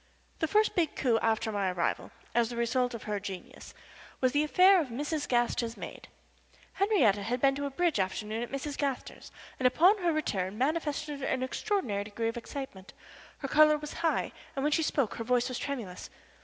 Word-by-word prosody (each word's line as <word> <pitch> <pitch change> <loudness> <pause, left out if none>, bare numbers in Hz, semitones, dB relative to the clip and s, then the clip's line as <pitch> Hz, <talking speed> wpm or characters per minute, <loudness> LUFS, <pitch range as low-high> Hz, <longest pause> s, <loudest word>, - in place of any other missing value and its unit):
The 320 - +1
first 425 +6 +3
big 335 -4 0
coup 235 -4 +2
after 220 0 +1
my 200 -2 0
arrival, 175 -1 -1 0.2
as 235 -1 +2
the 240 - -6
result 245 +1 +1
of 230 - -8
her 210 -1 -2
genius, 195 -2 -8 0.4
was 255 -1 +2
in 290 - +3
the - - +3
affair 365 +4 +6
of 300 - -3
Mrs. 290 +5 -3
Gaster's 240 -1 +1
maid. - - -8 0.7
Henriette 385 - +3
had 235 +5 -2
been 275 +1 +4
to 285 +1 -3
a - - -3
bridge 335 - +1
afternoon 210 +4 -2
at 240 - -4
Mrs. 275 +1 -4
Gaster's 275 -3 -3 0.3
and 255 - +4
upon 360 - +5
her 350 -2 +2
return 205 - -2
manifested 295 +1 -1
an 260 -1 -1
extraordinary 260 - -1
degree 225 +2 -2
of 230 - -5
excitement. 240 -6 -7 0.4
Her 275 - -4
color 305 +2 +6
was 300 0 -7
high, 330 -2 +1 0.2
and 270 - -2
when 300 - +2
she 325 - +3
spoke 280 -6 0
her 230 - -3
voice 250 +1 +2
was 255 -2 -4
tremulous. 230 -11 -5
260 Hz, 195 wpm, -30 LUFS, 225-305 Hz, 0.7 s, affair